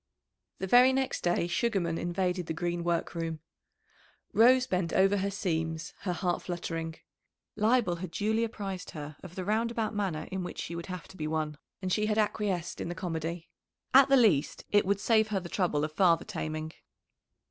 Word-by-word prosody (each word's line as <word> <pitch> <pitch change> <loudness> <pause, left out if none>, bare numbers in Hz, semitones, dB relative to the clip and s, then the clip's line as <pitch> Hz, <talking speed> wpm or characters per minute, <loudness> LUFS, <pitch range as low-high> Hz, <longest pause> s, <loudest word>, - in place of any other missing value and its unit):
The 190 - -3
very 250 +6 +6
next 265 0 -1
day 175 -1 +2
Sugarman 175 -3 0
invaded 180 0 -1
the 160 - -3
Green 175 0 -2
work 170 -1 -1
room. 165 -2 -3 0.9
Rose 250 +3 +6
bent 180 -8 -1
over 195 +1 +4
her 200 +1 0
seams, 160 -4 -2
her 190 - -2
heart 175 0 -1
fluttering. 165 -2 -4 0.6
Leibel 215 -4 +2
had 180 +1 -5
duly 215 +6 0
apprised 200 -5 -4
her 150 -1 -7
of 180 -1 -11
the 185 - -4
roundabout 225 +2 0
manner 195 -7 -2
in 190 -1 -2
which 180 - -6
she 170 - -4
would 170 - -6
have 180 -2 -6
to 190 - -13
be 155 - -3
won, 155 -1 -2 0.2
and 185 -1 0
she 215 +2 +1
had 215 0 0
acquiesced 205 -5 -1
in - - -3
the 175 - -4
comedy. 165 -1 -4 0.5
At 270 +1 +8
the 275 - +6
least 180 - +3
it 205 -2 +4
would 200 0 +2
save 220 0 +3
her 210 -3 0
the 175 -2 -8
trouble 170 -7 0
of 155 - -2
father 170 0 +3
taming. 155 -5 -4
180 Hz, 185 wpm, -30 LUFS, 165-210 Hz, 0.9 s, At